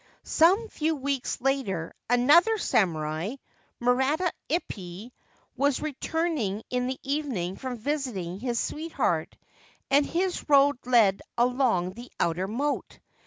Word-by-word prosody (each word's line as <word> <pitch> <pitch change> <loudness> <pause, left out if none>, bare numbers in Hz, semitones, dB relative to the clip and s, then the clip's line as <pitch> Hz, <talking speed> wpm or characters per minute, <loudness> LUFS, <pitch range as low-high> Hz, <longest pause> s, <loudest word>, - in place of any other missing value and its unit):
Some 380 +8 +4
few 320 -5 -1
weeks 275 -2 -2
later 240 -11 -1 0.2
another 300 - +5
samurai, 165 - 0 0.4
Murata 265 +8 +2 0.2
Ippai, 205 - -4 0.4
was 280 +1 +1
returning 295 - -2
in 250 0 0
the 260 0 -3
evening 265 - -2
from 255 +1 -5
visiting 225 - -3
his 240 0 -1
sweetheart, 265 - -2 0.5
and 285 +2 +5
his 355 +2 -2
road 280 -2 +5
led 220 -6 +4 0.2
along 240 -7 +2
the 240 +4 -11
outer 175 +3 0
moat. 280 +8 -2
255 Hz, 115 wpm, -27 LUFS, 200-295 Hz, 0.5 s, another